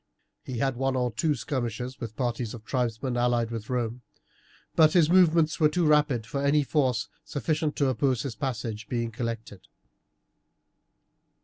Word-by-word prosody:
He 130 - -5
had 135 +1 0
one 135 0 0
or 125 -1 0
two 150 +6 0
skirmishes 125 0 -4
with 115 -3 -6
parties 120 -2 -2
of 110 -2 -12
tribesmen 125 0 -1
allied 120 -1 +1
with 110 -2 -6
Rome, 120 -1 -2 0.7
but 155 -1 +6
his 170 -3 +4
movements 165 -4 +4
were 155 -2 +5
too 175 +2 +1
rapid 150 -7 +3
for 140 +3 -3
any 145 +1 +3
force 130 -4 +1 0.2
sufficient 155 +1 -1
to 140 - +2
oppose 130 -2 +1
his 135 - -4
passage 115 -4 -4
being 115 -2 -2
collected. 115 -3 -5
125 Hz, 150 wpm, -27 LUFS, 115-145 Hz, 0.7 s, but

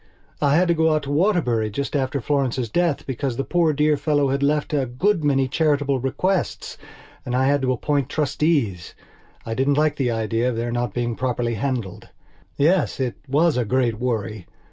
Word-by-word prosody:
I 145 0 +3
had 180 +3 +3
to - - +5
go 160 -1 +2
out 155 - -1
to 140 - -5
Waterbury 145 - +1
just 140 +8 -4
after 135 0 0
Florence's 130 -3 -1
death 170 -4 0
because 130 -1 -3
the 135 - -1
poor 170 -1 +2
dear 150 +1 +2
old 150 - +1
fellow 145 -3 +1
had 140 +1 -1
left 150 +2 0
a 140 -3 +1
good 165 - 0
many 135 -2 +2
charitable 145 -2 +1
bequests 180 +9 -2 0.5
and 125 - -3
I 130 +1 +2
had 140 +1 +2
to 130 -1 +1
appoint 140 +2 -1
trustees. 145 - -1 0.5
I 115 - -3
didn't 135 +4 +1
like 150 0 +2
the 130 -3 0
idea 115 +1 0
of 125 - -3
their 120 +1 -2
not 120 -3 -2
being 120 -1 -1
properly 120 -2 -1
handled. 115 -4 -4 0.5
Yes, 170 +4 +2
it 130 -2 -1
was 150 +2 +2
a 125 - +2
great 120 -1 0
worry. 110 -5 -3
135 Hz, 190 wpm, -22 LUFS, 120-150 Hz, 0.5 s, to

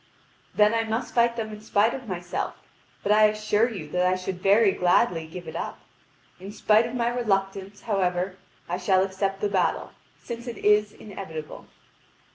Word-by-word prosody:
"Then 210 +1 +5
I 230 0 +1
must 225 +2 -3
fight 235 0 +3
them 225 -2 -3
in 210 0 -9
spite 215 +1 +2
of 260 -3 -7
myself. 175 -2 -4 0.5
But 200 - +1
I 215 0 +6
assure 215 +2 +2
you 195 -10 -7
that 180 +3 0
I 185 - +2
should 185 0 -5
very 200 +2 +5
gladly 175 -2 +2
give 175 +2 -9
it - - -7
up. - - -4 0.6
In 195 +2 -8
spite 215 +2 +3
of 240 - -7
my 235 -1 +1
reluctance, 195 -4 -2
however, 185 -3 -1 0.3
I 175 +1 -2
shall 185 0 +3
accept 195 0 -2
the 210 - +2
battle, 190 -2 0 0.3
since 235 +1 -7
it 235 - -5
is 210 0 +3
inevitable." 190 -8 -8
205 Hz, 175 wpm, -25 LUFS, 185-220 Hz, 0.6 s, I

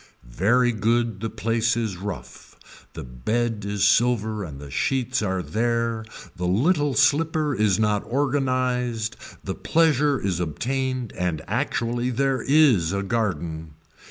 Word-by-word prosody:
Very 120 - +2
good 115 -1 0
the 115 +2 -3
place 115 +1 0
is 110 -5 -2
rough, 90 -9 -8 0.4
the - - -7
bed 105 - -2
is 100 0 +1
silver 110 0 +2
and 75 -6 -8
the 70 -1 -10
sheets 130 - 0
are 95 -3 -1
there, 115 +1 -1 0.3
the 90 0 -2
little 145 - +2
slipper 150 +2 +2
is 105 -5 +2
not 105 -2 +1
organized, 125 -4 0 0.3
the - - -3
pleasure 150 -4 +2
is 95 -3 -2
obtained 130 - -2
and 85 -3 -2
actually 120 +1 -1
there 130 0 0
is 130 - +4
a 100 0 -1
garden. 85 -7 -3
115 Hz, 130 wpm, -24 LUFS, 100-130 Hz, 0.4 s, is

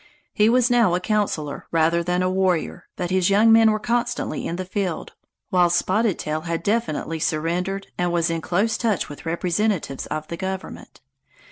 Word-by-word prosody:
He 210 +1 +4
was 245 +1 +3
now 230 -8 +4
a - - 0
councilor 180 -8 -2
rather 165 +1 +2
than 180 +1 0
a 185 - +1
warrior, 185 -3 0
but 180 -1 -3
his 185 -1 +2
young 215 +3 +5
men 225 0 +7
were 215 - +2
constantly 240 -6 -2
in 170 - -3
the 185 +1 -4
field, 185 -2 -3 0.4
while 180 -1 +4
Spotted 190 +3 +1
Tail 155 +1 -3
had 165 0 -3
definitely 185 -7 -1
surrendered 175 +6 -1
and 175 0 +1
was 170 -1 +1
in 165 -1 -2
close 200 +8 0
touch 220 -6 0
with 145 +2 -9
representatives 175 -3 -1
of 155 0 -4
the 170 - -6
government. 190 0 -6
180 Hz, 175 wpm, -23 LUFS, 165-210 Hz, 0.4 s, men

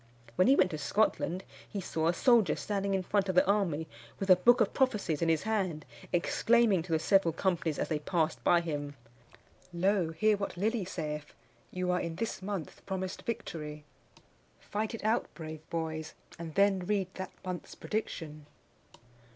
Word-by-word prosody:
When 185 - +4
he 270 - +7
went 185 -6 +3
to 155 - -4
Scotland, 185 +1 +1 0.3
he 205 - -4
saw 160 -3 -1
a 170 - +3
soldier 230 - +4
standing 200 -1 -1
in 190 - 0
front 195 +1 +1
of 185 - 0
the - - +6
army 180 -6 +1 0.3
with 195 -1 +2
a - - +10
book 240 +7 +5
of 220 - +2
prophecies 210 - +1
in 165 - +2
his 160 -2 +2
hand, 190 -8 -1 0.3
exclaiming 215 +3 +3
to 170 +1 -8
the 160 - +4
several 170 +2 +3
companies 165 -2 0
as - - -2
they 155 -2 0
passed 155 -5 -1
by 170 +6 +5
him, 145 -3 -4 0.8
"Lo! 180 0 +1
hear 210 +6 +2
what 200 -2 -4
Lilly 215 +1 0
saith: 150 -4 -5 0.3
you 180 0 -1
are 180 - +1
in 165 -1 -4
this 220 +2 -3
month 190 -6 -5
promised 190 -1 -3
victory! 155 -10 -5 0.8
Fight 215 +2 -3
it 225 - -9
out, 220 +3 +1
brave 155 -2 -7
boys! 160 -1 -3 0.2
and 165 -2 -7
then 200 -1 +4
read 190 0 -1
that 190 0 -5 0.2
month's 180 -1 -5
prediction!" 155 -8 -4
185 Hz, 175 wpm, -31 LUFS, 160-205 Hz, 0.8 s, a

